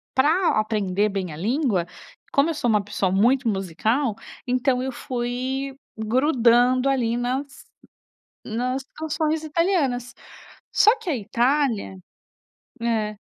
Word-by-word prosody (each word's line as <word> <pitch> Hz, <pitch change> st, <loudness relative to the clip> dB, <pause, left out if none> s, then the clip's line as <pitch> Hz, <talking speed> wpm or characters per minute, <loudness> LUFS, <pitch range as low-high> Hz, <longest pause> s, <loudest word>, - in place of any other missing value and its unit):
para 310 Hz, -, +3 dB
aprender 210 Hz, -2 st, 0 dB
bem 195 Hz, -4 st, -3 dB
a 150 Hz, -, -8 dB
língua, 220 Hz, -, 0 dB, 0.5 s
como 280 Hz, +3 st, +3 dB
eu 330 Hz, -, 0 dB
sou 290 Hz, -5 st, -1 dB
uma 210 Hz, -2 st, +3 dB
pessoa 195 Hz, -2 st, -1 dB
muito 240 Hz, +7 st, +3 dB
musical, 215 Hz, -, 0 dB, 0.3 s
então 255 Hz, 0 st, +1 dB
eu 265 Hz, -, -2 dB
fui 255 Hz, +2 st, -3 dB, 0.2 s
grudando 245 Hz, +2 st, +3 dB
ali 240 Hz, -4 st, +1 dB
nas 265 Hz, +3 st, -3 dB, 0.8 s
nas 255 Hz, +4 st, -2 dB
canções 315 Hz, 0 st, -1 dB
italianas, 300 Hz, -7 st, 0 dB, 0.6 s
só 430 Hz, +2 st, +6 dB
que -, -, -9 dB
a 290 Hz, -, 0 dB
Itália 235 Hz, -1 st, 0 dB, 0.9 s
É. 220 Hz, -2 st, -1 dB
250 Hz, 115 wpm, -23 LUFS, 215-275 Hz, 0.9 s, só